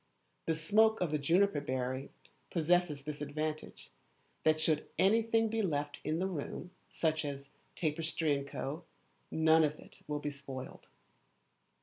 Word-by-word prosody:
The 165 - +2
smoke 215 +7 +4
of 175 -4 0
the 150 - +1
juniper 170 +2 +3
berry 130 +1 -2 0.4
possesses 170 -3 +2
this 150 0 -5
advantage, 155 +1 -4 0.5
that 155 0 +4
should 155 -1 +1
anything 225 +2 +4
be 225 +1 0
left 145 -6 -1
in 155 +1 0
the 185 - 0
room, 180 0 -4 0.2
such 160 -1 0
as; 140 -1 -5 0.3
tapestry, 155 -2 0
&c., - - -4 0.7
none 160 0 +5
of 150 0 +1
it - - -15
will 150 0 -1
be 145 0 -3
spoiled. 135 -2 -8
155 Hz, 135 wpm, -33 LUFS, 145-175 Hz, 0.7 s, none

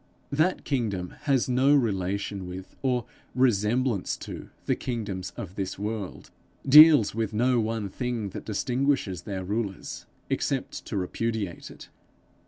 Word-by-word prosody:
That 160 +6 +1
kingdom 105 -10 -1 0.2
has 135 -3 +3
no 130 +3 +4
relation 100 -5 -1
with 90 +1 -8
or 125 -3 0 0.3
resemblance 120 -2 +1
to - - -8 0.2
the - - +2
kingdoms 105 -7 -4
of 100 -7 -6
this 95 -1 -4
world, 105 -1 -5 0.4
deals 150 -5 +9
with 110 -1 -2
no 125 +3 +3
one 110 -2 -1
thing 120 0 -3
that - - -7
distinguishes 125 -2 0
their 95 -3 -5
rulers, 100 0 -4 0.2
except - - -2
to - - -3
repudiate 100 0 -3
it. - - -13
110 Hz, 130 wpm, -27 LUFS, 100-125 Hz, 0.4 s, deals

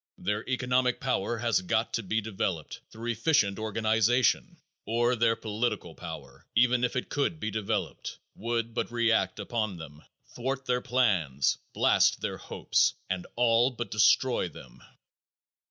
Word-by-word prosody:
Their 105 +1 -2
economic 125 0 +1
power 120 -3 -1
has 115 -3 +1
got 110 +5 0
to 115 - 0
be 110 +2 -1
developed 95 -6 -3
through 115 +1 -4
efficient 110 -4 +2
organization, 110 +2 +1 0.3
or 120 +3 +1
their 115 -1 +3
political 110 +2 -2
power, - - -9
even 125 +1 +4
if 125 - 0
it 125 - -2
could 145 +3 -1
be 110 - -3
developed, 105 -1 -3 0.2
would 115 0 -2
but 120 - -2
react 115 -5 +1
upon 110 -2 -2
them, 75 -2 -11 0.3
thwart 135 +2 -3
their 125 -1 +1
plans, 95 - +1
blast - - +3
their - - -3
hopes, - - +1 0.2
and 90 -1 -3
all 120 +1 +4
but 120 -2 -6
destroy 105 - +3
them. 60 - -14
115 Hz, 140 wpm, -28 LUFS, 105-125 Hz, 0.3 s, even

